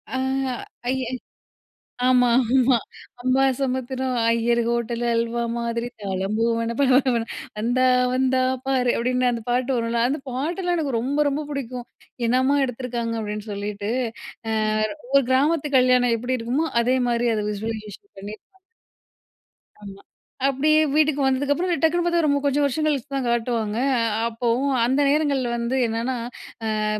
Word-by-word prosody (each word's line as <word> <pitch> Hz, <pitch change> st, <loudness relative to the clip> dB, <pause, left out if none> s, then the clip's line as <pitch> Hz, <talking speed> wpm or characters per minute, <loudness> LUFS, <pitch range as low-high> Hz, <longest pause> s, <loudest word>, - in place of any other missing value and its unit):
அ -, -, 0 dB, 0.7 s
அய்யய் 255 Hz, -1 st, -1 dB, 0.9 s
ஆமா, 250 Hz, -1 st, +4 dB, 0.2 s
ஆமா. 255 Hz, -1 st, +4 dB, 0.4 s
"அம்பாசமுத்திரம் 260 Hz, 0 st, 0 dB, 0.2 s
ஐயர் 235 Hz, +1 st, +2 dB
ஹோட்டலு 235 Hz, 0 st, -1 dB
அல்வா 235 Hz, +1 st, -1 dB
மாதிரி 235 Hz, 0 st, -2 dB
தாளம் 195 Hz, +1 st, -2 dB
பூவென 230 Hz, 0 st, 0 dB
பள 275 Hz, -, +4 dB
பள 260 Hz, -1 st, +3 dB
வென 230 Hz, -1 st, -1 dB, 0.3 s
வந்தா 245 Hz, +3 st, +1 dB, 0.3 s
வந்தா 260 Hz, 0 st, +2 dB, 0.3 s
பாரு" 255 Hz, -2 st, +2 dB
அப்டின்னு 250 Hz, +1 st, +1 dB
அந்த 230 Hz, -1 st, -3 dB
பாட்டு 250 Hz, +2 st, +1 dB
வரும்ல, 230 Hz, 0 st, -1 dB
அந்த 280 Hz, +3 st, -1 dB
பாட்டெல்லாம் 345 Hz, +8 st, -1 dB
எனக்கு 275 Hz, -7 st, -1 dB
ரொம்ப 285 Hz, +5 st, 0 dB
ரொம்ப 295 Hz, +2 st, -2 dB
புடிக்கும். 250 Hz, -3 st, -5 dB, 0.4 s
என்னம்மா 260 Hz, +4 st, +3 dB
எடுத்துருக்காங்க 240 Hz, -2 st, -4 dB
அப்டின்னு 210 Hz, 0 st, -5 dB
சொல்லிட்டு. 205 Hz, +1 st, -4 dB, 0.6 s
அ -, -, -1 dB, 0.6 s
ஒரு 275 Hz, -, +6 dB
கிராமத்து 295 Hz, +3 st, +2 dB
கல்யாணம் 250 Hz, -2 st, +4 dB
எப்டி 250 Hz, +2 st, -2 dB
இருக்குமோ 260 Hz, +8 st, -1 dB
அதே 255 Hz, +2 st, +2 dB
மாரி 235 Hz, 0 st, +1 dB
அத 210 Hz, -, -1 dB
விஸ்வலைசேஷன் 215 Hz, -, -7 dB
பண்ணியிருப்பாங்க. 215 Hz, -, -11 dB, 1.2 s
ஆமா. 200 Hz, -1 st, -10 dB, 0.5 s
அப்டியே 305 Hz, +3 st, +3 dB
வீட்டுக்கு 305 Hz, -1 st, +3 dB
வந்ததுக்கப்புறம் 285 Hz, +7 st, +1 dB
டக்குனு 340 Hz, +2 st, +3 dB
பார்த்தா, 345 Hz, 0 st, +2 dB
ரொம்ப 285 Hz, -1 st, +2 dB
கொஞ்சம் 285 Hz, +1 st, +2 dB
வருஷம் 295 Hz, +3 st, 0 dB
கழிச்சு 285 Hz, -2 st, -1 dB
தான் 270 Hz, -2 st, -1 dB
காட்டுவாங்க. 230 Hz, -2 st, -1 dB, 0.2 s
அ -, -, +1 dB, 0.3 s
அப்போவும் 240 Hz, +4 st, 0 dB
அந்த 265 Hz, +4 st, +2 dB
நேரங்கள்ல 280 Hz, -4 st, +1 dB
வந்து 235 Hz, +2 st, -1 dB
என்னென்னா, 230 Hz, +3 st, -2 dB, 0.7 s
அ -, -, 0 dB
250 Hz, 135 wpm, -23 LUFS, 230-275 Hz, 1.2 s, ஒரு